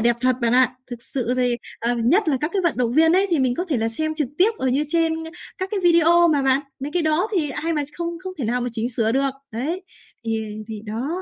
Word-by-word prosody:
đẹp 235 Hz, +1 st, +3 dB
thật 255 Hz, -1 st, +2 dB
bạn 235 Hz, 0 st, +1 dB
ạ. 255 Hz, 0 st, +4 dB, 0.2 s
Thực 235 Hz, -1 st, -7 dB
sự 250 Hz, -2 st, -2 dB
thì, 245 Hz, -1 st, +1 dB, 0.2 s
ờ, 235 Hz, +1 st, 0 dB
nhất 300 Hz, -, +2 dB
là 280 Hz, -, +2 dB
các 300 Hz, -, -1 dB
cái 380 Hz, -, +1 dB
vận 340 Hz, -6 st, +1 dB
động 240 Hz, -2 st, 0 dB
viên 320 Hz, +3 st, +5 dB
ấy 385 Hz, +2 st, +4 dB
thì 335 Hz, -, +2 dB
mình 255 Hz, -2 st, +2 dB
có 355 Hz, -, -2 dB
thể 310 Hz, -8 st, -1 dB
là 225 Hz, 0 st, 0 dB
xem 310 Hz, +7 st, -2 dB
trực 300 Hz, -5 st, -1 dB
tiếp 390 Hz, +5 st, +5 dB
ở 260 Hz, -, 0 dB
như 280 Hz, +4 st, +1 dB
trên 330 Hz, 0 st, +2 dB, 0.5 s
các 375 Hz, 0 st, -2 dB
cái 410 Hz, -, -1 dB
video 340 Hz, 0 st, +5 dB
mà 290 Hz, -3 st, +2 dB
bạn. 265 Hz, +1 st, +3 dB, 0.2 s
Mấy 285 Hz, +2 st, -5 dB
cái 350 Hz, -2 st, +1 dB
đó 315 Hz, +7 st, +1 dB
thì 310 Hz, -7 st, 0 dB
ai 325 Hz, +4 st, -2 dB
mà 300 Hz, -2 st, 0 dB
không 340 Hz, -1 st, -2 dB
không 370 Hz, +1 st, -7 dB
thể 265 Hz, -, -2 dB
nào 245 Hz, +3 st, 0 dB
mà 245 Hz, -, -1 dB
chỉnh 230 Hz, +1 st, -2 dB
sửa 225 Hz, -1 st, 0 dB
được. 275 Hz, +1 st, +2 dB, 0.2 s
Đấy, 295 Hz, +12 st, -3 dB, 0.4 s
thì 225 Hz, -1 st, -1 dB, 0.3 s
thì 215 Hz, -1 st, -6 dB
đó, 225 Hz, +6 st, -3 dB
275 Hz, 265 wpm, -22 LUFS, 240-335 Hz, 0.5 s, viên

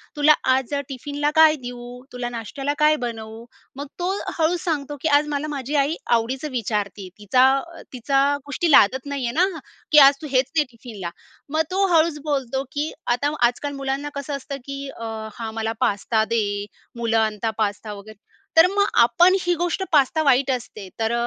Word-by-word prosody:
तुला 295 Hz, +1 st, +5 dB, 0.2 s
आज 265 Hz, +1 st, -1 dB, 0.2 s
टिफिनला 290 Hz, +2 st, -2 dB
काय 315 Hz, -1 st, +7 dB
देऊ? 245 Hz, 0 st, -8 dB
तुला 245 Hz, -1 st, -4 dB
नाश्त्याला 255 Hz, +5 st, -4 dB
काय 305 Hz, 0 st, +5 dB
बनवू?" 225 Hz, 0 st, -7 dB, 0.3 s
मग 285 Hz, +1 st, -6 dB
तो 355 Hz, +2 st, 0 dB, 0.3 s
हळूच 335 Hz, +1 st, +1 dB
सांगतो 295 Hz, -4 st, -2 dB
की 320 Hz, -, 0 dB
"आज 295 Hz, -, -1 dB
मला 295 Hz, 0 st, -2 dB
माझी 285 Hz, -1 st, -4 dB
आई 285 Hz, +3 st, +2 dB, 0.2 s
आवडीचं 255 Hz, +5 st, 0 dB
विचारते, 210 Hz, -4 st, -3 dB
तिचा 250 Hz, +6 st, +4 dB, 0.5 s
तिचा 270 Hz, +3 st, +1 dB, 0.2 s
गोष्टी 315 Hz, +3 st, -1 dB
लादत 260 Hz, +2 st, +5 dB
नाही 280 Hz, -2 st, -3 dB
आहे 235 Hz, -, -2 dB
ना 355 Hz, 0 st, +1 dB, 0.3 s
की 305 Hz, -, +5 dB
आज 280 Hz, -, +4 dB
तू 305 Hz, -, -6 dB
हेच 260 Hz, 0 st, +1 dB
ने 300 Hz, -, +5 dB
टिफिनला." 220 Hz, -7 st, -8 dB, 0.4 s
मग 315 Hz, -, +3 dB
तो 390 Hz, +1 st, +2 dB
हळूच 315 Hz, -1 st, +3 dB
बोलतो 270 Hz, -3 st, -2 dB
की 300 Hz, +1 st, -2 dB, 0.2 s
आता 265 Hz, +5 st, +1 dB
आजकाल 285 Hz, +4 st, -1 dB
मुलांना 275 Hz, +1 st, -3 dB
कसं 280 Hz, +1 st, -4 dB
असतं 275 Hz, 0 st, -7 dB
की 275 Hz, 0 st, -6 dB
"अ, 230 Hz, -, -10 dB, 0.3 s
हां 225 Hz, -2 st, -6 dB
मला 225 Hz, 0 st, -2 dB
पास्ता 220 Hz, -1 st, +1 dB
दे." 225 Hz, -2 st, +2 dB, 0.5 s
मुलं 230 Hz, -1 st, 0 dB
आणता 220 Hz, 0 st, 0 dB
पास्ता 210 Hz, 0 st, -2 dB
वगैरे. 205 Hz, +1 st, -12 dB, 0.4 s
तर 330 Hz, -, +8 dB
मग 405 Hz, 0 st, +3 dB, 0.2 s
आपण 350 Hz, +10 st, +5 dB
ही 355 Hz, 0 st, +1 dB
गोष्ट, 350 Hz, +2 st, -1 dB
पास्ता 305 Hz, +1 st, +3 dB
वाईट 270 Hz, -1 st, +3 dB
असते 220 Hz, -5 st, -5 dB
तर 225 Hz, +1 st, 0 dB
270 Hz, 175 wpm, -22 LUFS, 230-300 Hz, 0.5 s, तर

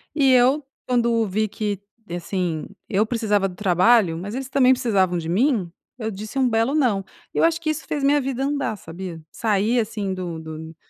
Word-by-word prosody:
E 270 Hz, -3 st, +4 dB
eu, 260 Hz, +4 st, +4 dB, 0.2 s
quando 235 Hz, -3 st, +2 dB
vi 215 Hz, +3 st, 0 dB
que 205 Hz, -1 st, -3 dB, 0.3 s
assim 175 Hz, -2 st, -2 dB, 0.2 s
eu 210 Hz, +1 st, +2 dB
precisava 215 Hz, -4 st, +1 dB
do 180 Hz, -, -9 dB
trabalho, 185 Hz, -1 st, +3 dB
mas 195 Hz, +5 st, -6 dB
eles 265 Hz, +1 st, -4 dB
também 260 Hz, -2 st, +5 dB
precisavam 190 Hz, -8 st, +1 dB
de 165 Hz, -1 st, -4 dB
mim, 205 Hz, -, +1 dB, 0.3 s
eu 220 Hz, -3 st, -3 dB
disse 215 Hz, +6 st, -5 dB
um 255 Hz, -2 st, +3 dB
belo 225 Hz, +5 st, +1 dB
"não!". 235 Hz, -10 st, +2 dB, 0.3 s
Eu -, -, +1 dB
acho 330 Hz, 0 st, +3 dB
que 320 Hz, -, -1 dB
isso 310 Hz, 0 st, -2 dB
fez 290 Hz, -2 st, -2 dB
minha 285 Hz, +1 st, +4 dB
vida 265 Hz, 0 st, -2 dB
andar, 280 Hz, -6 st, -1 dB
sabia? 170 Hz, -1 st, -8 dB
Sair 220 Hz, +2 st, +1 dB
assim 210 Hz, -3 st, -2 dB
do 175 Hz, -3 st, -5 dB
do 160 Hz, 0 st, -8 dB
215 Hz, 185 wpm, -23 LUFS, 185-255 Hz, 0.3 s, também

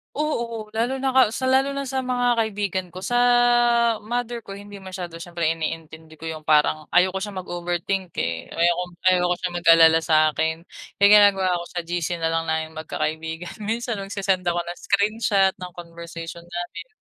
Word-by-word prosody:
Oo, 235 Hz, -7 st, -2 dB
lalo 245 Hz, +4 st, 0 dB
na 265 Hz, -1 st, -1 dB
ka 265 Hz, -, +7 dB
sa 260 Hz, +3 st, -3 dB
lalo 265 Hz, +1 st, +3 dB
na 275 Hz, 0 st, -4 dB
sa 265 Hz, 0 st, -2 dB
mga 245 Hz, -1 st, +1 dB
kaibigan 205 Hz, -4 st, -1 dB
ko. 185 Hz, -, -9 dB
Sa 190 Hz, +6 st, -3 dB, 0.9 s
mother 240 Hz, +1 st, -3 dB
ko, 195 Hz, 0 st, -9 dB
hindi 205 Hz, -1 st, -11 dB
masyado, 180 Hz, -3 st, -7 dB
syempre 170 Hz, -2 st, -3 dB
iniintindi 160 Hz, -1 st, -7 dB
ko 165 Hz, -, -8 dB
yung 160 Hz, -1 st, -5 dB
parang 155 Hz, 0 st, +2 dB
ayaw 185 Hz, +1 st, +3 dB
ko 190 Hz, -, -2 dB
siyang 205 Hz, -3 st, -5 dB
mag-overthink 175 Hz, +1 st, -3 dB
eh, 85 Hz, 0 st, -3 dB
ayaw 170 Hz, +1 st, +2 dB
kong 180 Hz, 0 st, -8 dB
ayaw 180 Hz, -1 st, +5 dB
ko -, -, +3 dB
siyang 180 Hz, -1 st, -3 dB
mag-alala 165 Hz, -1 st, +7 dB
sakin. 160 Hz, +1 st, +1 dB, 0.3 s
Kaya 200 Hz, -, +6 dB
ang -, -, +6 dB, 0.2 s
ginagawa 185 Hz, -3 st, -1 dB
ko, -, -, -8 dB
sa 175 Hz, -, -3 dB
GC 175 Hz, 0 st, -2 dB
nalang 165 Hz, 0 st, 0 dB
naming 160 Hz, 0 st, -2 dB
magkakaibigan. 160 Hz, +2 st, -4 dB
Minsan, 225 Hz, -1 st, -2 dB
nagsesend 195 Hz, -2 st, -1 dB
ako 175 Hz, -1 st, 0 dB
ng 175 Hz, -, -6 dB
screenshot 200 Hz, -1 st, +2 dB
ng 180 Hz, -1 st, -9 dB
conversation 170 Hz, 0 st, -8 dB
namin. 175 Hz, +3 st, -7 dB
180 Hz, 175 wpm, -23 LUFS, 165-210 Hz, 0.9 s, ka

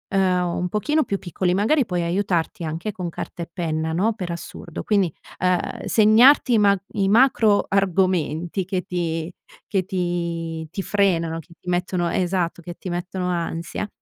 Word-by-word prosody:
uhm, 180 Hz, -2 st, +2 dB
un 180 Hz, -, -1 dB
pochino 300 Hz, -, +1 dB
più 200 Hz, -, -2 dB
piccoli, 180 Hz, 0 st, -1 dB
magari 230 Hz, +8 st, +2 dB
puoi 180 Hz, -3 st, -1 dB
aiutarti 175 Hz, -2 st, -1 dB
anche 165 Hz, +7 st, -3 dB
con 180 Hz, -2 st, -5 dB
carta 170 Hz, +1 st, -6 dB
e 170 Hz, -, -10 dB
penna, 160 Hz, -2 st, -2 dB
no, 210 Hz, +6 st, +2 dB
per 180 Hz, -5 st, -4 dB
assurdo. 170 Hz, -1 st, -7 dB
Quindi, 195 Hz, -7 st, +1 dB, 0.3 s
uhm, 180 Hz, -1 st, 0 dB
segnarti 235 Hz, +4 st, +6 dB
i -, -, +5 dB
ma 200 Hz, -1 st, +5 dB, 0.2 s
i 195 Hz, -3 st, +1 dB
macro 225 Hz, -3 st, +4 dB
argomenti 185 Hz, -2 st, +1 dB
che 185 Hz, -1 st, -1 dB
ti 170 Hz, -2 st, -3 dB, 0.4 s
che 190 Hz, -4 st, 0 dB
ti 170 Hz, -3 st, -3 dB
ti 195 Hz, -, -3 dB
frenano, 170 Hz, -5 st, +1 dB
che 170 Hz, +1 st, -14 dB
ti 180 Hz, -, -8 dB
mettono 175 Hz, -1 st, 0 dB
esatto, 175 Hz, -1 st, -1 dB
che 175 Hz, -, -6 dB
ti 185 Hz, -, -7 dB
mettono 180 Hz, +1 st, -3 dB
ansia 170 Hz, +2 st, -3 dB
180 Hz, 165 wpm, -23 LUFS, 170-200 Hz, 0.4 s, segnarti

